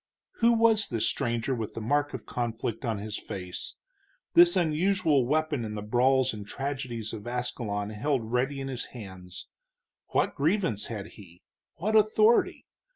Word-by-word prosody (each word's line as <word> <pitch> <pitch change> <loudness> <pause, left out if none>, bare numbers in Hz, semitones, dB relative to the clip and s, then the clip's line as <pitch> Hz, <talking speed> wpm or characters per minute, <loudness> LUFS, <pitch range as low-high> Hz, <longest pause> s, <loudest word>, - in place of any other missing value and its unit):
Who 235 0 +4
was 225 -2 +3
this 115 -2 0
stranger 120 +2 0
with 115 -4 -4
the - - -3
mark 145 +6 0
of 110 -4 -8
conflict 115 -1 -3
on 115 -3 -1
his 105 +1 -4
face, 90 -2 -6 0.6
this 175 +1 +7
unusual 165 -4 +2
weapon 155 -2 0
in 105 -1 -5
the 105 - -5
brawls 130 +3 +3
and 105 -1 -6
tragedies 130 -2 -4
of 110 0 -7
Ascalon 115 -4 -3
held 115 0 -1
ready 135 +3 0
in 135 - -4
his 130 -2 -4
hands? 95 -4 -9 0.6
What - - +1
grievance 160 - 0
had 105 -4 -5
he? 90 -5 -15 0.3
what 215 +6 -1
authority? 215 +2 +4
125 Hz, 155 wpm, -28 LUFS, 110-155 Hz, 0.6 s, this